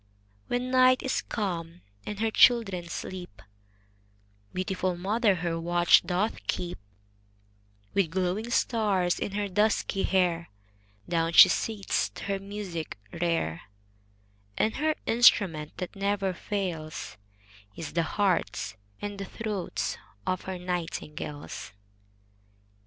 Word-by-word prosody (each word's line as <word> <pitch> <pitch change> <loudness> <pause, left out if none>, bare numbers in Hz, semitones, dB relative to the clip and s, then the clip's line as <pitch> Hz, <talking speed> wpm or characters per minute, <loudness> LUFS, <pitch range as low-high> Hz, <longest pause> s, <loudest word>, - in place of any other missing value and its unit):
When 245 +1 -1
night 255 0 +5
is 265 - 0
come, 175 -5 -4 0.3
and 210 -1 -4
her 225 0 +1
children 195 -9 +4
sleep, 175 - -6 1.1
Beautiful 185 -1 -1
mother 205 +3 +2
her 170 -1 -2
watch 175 +1 +5
doth 180 - -2
keep; 90 0 -2 1.1
With 195 -5 +2
glowing 190 +6 -1
stars 205 -7 +1
in 200 - -3
her 205 0 -1
dusky 210 0 +1
hair 175 -3 +1 0.6
Down 165 -1 0
she - - +10
sits 195 - 0
to - - -7
her 195 -1 -1
music 195 - -5 0.2
rare; 165 - 0 1.0
And 220 - +1
her 310 +2 +1
instrument 190 -10 +4
that 180 +1 -5
never 195 -1 0
fails, 175 -5 -4 0.6
Is 160 -3 -6
the 170 - +2
hearts 175 - 0 0.3
and 205 -1 -4
the 195 - -3
throats 210 -2 -3 0.3
of 185 - -1
her 190 -1 -4
nightingales. 165 - -5
185 Hz, 115 wpm, -28 LUFS, 170-205 Hz, 1.1 s, she